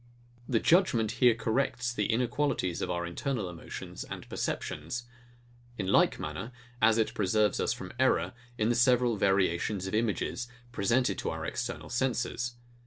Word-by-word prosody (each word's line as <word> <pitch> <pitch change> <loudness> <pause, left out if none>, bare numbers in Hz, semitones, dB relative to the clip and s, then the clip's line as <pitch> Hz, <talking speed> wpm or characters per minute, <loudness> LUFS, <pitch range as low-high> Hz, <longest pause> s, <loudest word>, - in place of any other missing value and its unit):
The 120 -4 +3
judgement 125 - +3
here 120 -2 +7
corrects 120 +2 0
the 105 -3 0
inequalities 120 - 0
of - - -2
our 85 -1 -1
internal 105 +5 -2
emotions 85 -1 -7
and - - -8
perceptions; 80 +11 -3 0.7
in 95 - -2
like 95 - +4
manner, 75 +11 -5 0.3
as 110 0 +5
it 110 - +1
preserves 105 +1 +2
us - - +1
from - - -6
error, - - +2 0.2
in 110 +1 +2
the - - +4
several 125 -1 +4
variations 95 0 +1
of 95 - -4
images, 115 +2 0 0.2
presented 115 0 +1
to - - -2
our 80 0 -4
external 120 +6 -4
senses. 120 -1 -1
115 Hz, 150 wpm, -30 LUFS, 95-120 Hz, 0.7 s, here